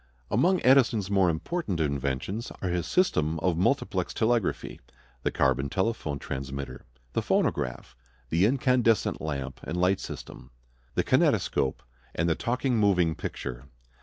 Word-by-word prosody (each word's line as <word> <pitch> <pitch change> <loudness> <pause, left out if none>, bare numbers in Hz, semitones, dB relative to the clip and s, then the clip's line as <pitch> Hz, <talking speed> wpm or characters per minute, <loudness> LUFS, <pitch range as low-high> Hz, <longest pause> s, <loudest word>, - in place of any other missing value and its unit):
Among 175 - +3
Edison's 120 -7 +4
more 95 -3 +4
important 95 - -2
inventions 70 - -2
are 95 - -2
his 90 -1 -1
system 80 - +2
of 90 -1 +1
multiplex 90 +3 0
telegraphy; 115 -3 0 0.4
the - - 0
carbon 70 +1 +1
telephone 95 -5 -1
transmitter; 70 -1 -6 0.3
the - - +1
phonograph; 65 - -1 0.3
the 85 +8 +3
incandescent 125 -3 +2
lamp 70 -4 -4
and 85 - -4
light 90 +2 +2
system; - - -8 0.5
the - - +2
kinetoscope; 65 -1 +1 0.3
and 85 - +1
the 85 - +3
talking 125 - -1
moving 90 -6 +3
picture. - - -6
90 Hz, 130 wpm, -27 LUFS, 70-115 Hz, 0.5 s, Edison's